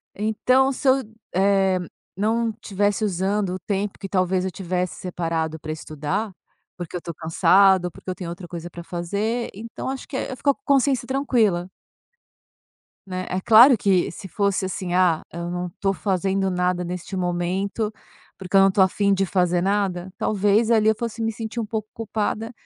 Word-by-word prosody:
Então 255 +6 +2
se 275 - -3
eu, 260 - +7 0.4
eh, 190 -1 +3 0.4
não 225 +3 +1
tivesse 205 +1 0
usando 195 +1 0
o - - -6
tempo 200 +2 -3
que 195 - -7
talvez 185 -1 +1
eu 190 - -2
tivesse 180 -1 -2
separado 165 -3 -3
para 155 - -6
estudar, 155 +7 -3 0.5
porque 175 -1 -7
eu - - +1
estou 170 - -7
cansada 180 +3 +4
ou - - -7
porque - - -11
eu 185 - -2
tenho 175 -3 -6
outra 175 +1 -7
coisa 170 0 -7
para 170 0 -9
fazer, 200 +8 -2
então 230 +5 -6
acho 265 0 -5
que 265 - -4
é - - -3
eu - - -4
fico 280 +3 +2
com - - -32
consciência 270 -2 +2
tranquila 225 -10 +1 1.3
né, 185 -1 -4
é 185 +1 -2
claro 235 +5 +8
que 190 -5 +2
se 190 - -9
fosse 200 +1 0
assim, 185 -1 -4
ah, 180 -3 +3
eu 170 +1 -4
não 180 0 -3
estou 195 +3 -1
fazendo 195 0 0
nada 180 0 0
neste 180 +2 -5
momento 185 +4 -1 0.5
porque 190 0 -5
eu - - +8
não 195 - +6
estou 190 0 +4
a 190 - +5
fim 200 +1 +1
de 195 0 +1
fazer 180 -1 +1
nada, 190 -2 -1
talvez 210 +2 +2
ali 220 -2 +4
eu 220 - +3
fosse 230 -1 -4
me 225 0 0
sentir 225 +2 -5
um 225 - -1
pouco 215 0 -4
culpada 225 0 -3
195 Hz, 185 wpm, -23 LUFS, 180-215 Hz, 1.3 s, claro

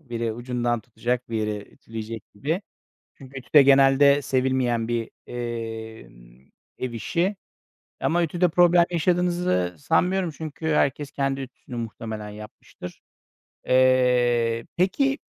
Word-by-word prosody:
Biri 115 -5 -3
ucundan 120 0 -2
tutacak, 120 +2 -3
biri 105 -2 -3
ütüleyecek 115 -1 -7
gibi. 160 - -2 0.5
Çünkü 135 0 -10
ütü 120 -3 -18
de 145 - +9
genelde 140 +1 +5
sevilmeyen 130 -4 0
bir, 120 -1 -2 0.2
emm, 110 - -7 0.3
ev 130 -2 -4
işi. 170 - -1 0.7
Ama 170 +1 +2
ütüde 175 +2 +1
problem 175 0 +5
yaşadığınızı 175 - +1
sanmıyorum. 180 - +1
Çünkü 155 +1 -8
herkes 145 -2 +1
kendi 135 -1 -1
ütüsünü 130 -1 -10
muhtemelen 110 -2 -6
yapmıştır. 105 -4 -11 0.6
Eee, 125 -3 +3
peki, 270 - +2
125 Hz, 110 wpm, -24 LUFS, 115-150 Hz, 0.7 s, de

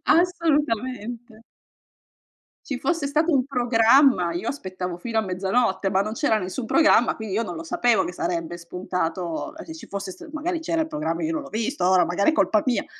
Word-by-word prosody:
Assolutamente. 260 - 0 1.3
Ci 270 -3 -4
fosse 330 -2 0
stato 310 +4 +1
un 265 -2 +3
programma, 240 -5 +4
io 175 +6 -4
aspettavo 185 -8 -4
fino 225 +5 -4
a - - +4
mezzanotte, 195 +2 0
ma 190 0 +2
non 215 +2 -3
c'era 230 -3 +1
nessun 190 +6 -4
programma, 245 -4 +4
quindi, 220 -3 -5
io 225 - +1
non 180 -5 -6
lo 165 - -6
sapevo 220 +4 +2
che 180 - -5
sarebbe 170 -1 -3
spuntato 175 -1 -4
e 320 - -9
che 320 - -8
ci 320 - -10
fosse 200 -1 -5
s 335 - -12
magari, 325 +2 -3
c'era 330 0 -1
il 320 - 0
programma, 300 - -3
e - - +1
io 320 - -1
non 310 - -2
l'ho 280 - -10
visto, 230 0 -2
ora, 185 -1 +4
magari, 180 - +2
è - - +1
colpa 215 -8 +2
mia, 255 -3 0
230 Hz, 200 wpm, -24 LUFS, 185-290 Hz, 1.3 s, programma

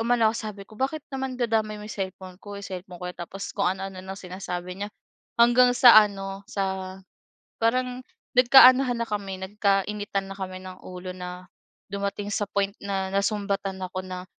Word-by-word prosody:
umano 230 -1 +3
ako - - -10
sabi 210 -3 -6
ko, 215 - -14
"Bakit 275 +3 -1
naman 265 -1 -3
dadamay 220 -3 +1
mo 210 - -8
cellphone 185 -2 -6
ko, 205 -1 -8
eh, - - -9
cellphone 180 -1 -8
ko 180 - -4
'yan." - - -16
tapos 195 +3 -7
kung 200 -3 +2
ano-ano 190 0 -6
nang 190 +1 -7
sinasabi 180 0 -6
niya. - - -5 0.5
Hanggang 245 +1 +6
sa 240 -3 +9
ano, 195 -1 -7
sa 190 -1 -3 0.6
parang 250 +2 +1 0.4
nagkaanuhan 255 0 +7
na 235 - 0
kami, 195 -2 -4
nagkainitan 200 0 0
na 195 - -7
kami 185 -1 -5
ng 185 0 -10
ulo 185 0 -7
na 180 0 -8 0.4
dumating 200 +1 -3
sa 205 - 0
point 200 0 0
na 195 -1 -1
nasumbatan 200 -1 -1
ako, 185 0 -4
na 185 0 -6
200 Hz, 170 wpm, -26 LUFS, 190-220 Hz, 0.6 s, sa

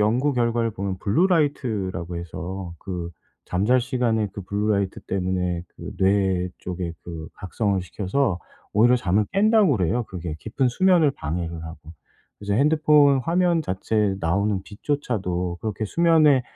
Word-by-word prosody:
연구 125 +7 +2
결과를 115 -2 +1
보면 95 -1 -3
블루 115 - +2
라이트라고 110 - -1
해서 85 +1 -6
그 90 -3 -5 0.3
잠잘 105 +8 +2
시간에 120 -4 0
그 100 - -5
블루 105 +3 -1
라이트 100 -2 -1
때문에 90 -2 -2
그 - - -8
뇌 95 -2 +2
쪽에 90 -2 -4
그 80 -2 -7
각성을 100 0 -1
시켜서 100 +1 -1 0.3
오히려 120 +4 +5
잠을 105 -1 +1
깬다 215 +2 +4
그래요 120 - +1
그게 85 -4 -5
깊은 130 +4 -1
수면을 170 +1 +3
방해를 85 - -4
하고. 80 -1 -8 0.6
이제 100 0 -1
핸드폰 150 -1 +4
화면 170 +3 +1
자체에 100 -1 0
나오는 95 +4 +1
빛조차도 95 -8 -2
그렇게 110 0 -3
수면에 155 -2 +4
105 Hz, 315 characters per minute, -23 LUFS, 90-130 Hz, 0.6 s, 오히려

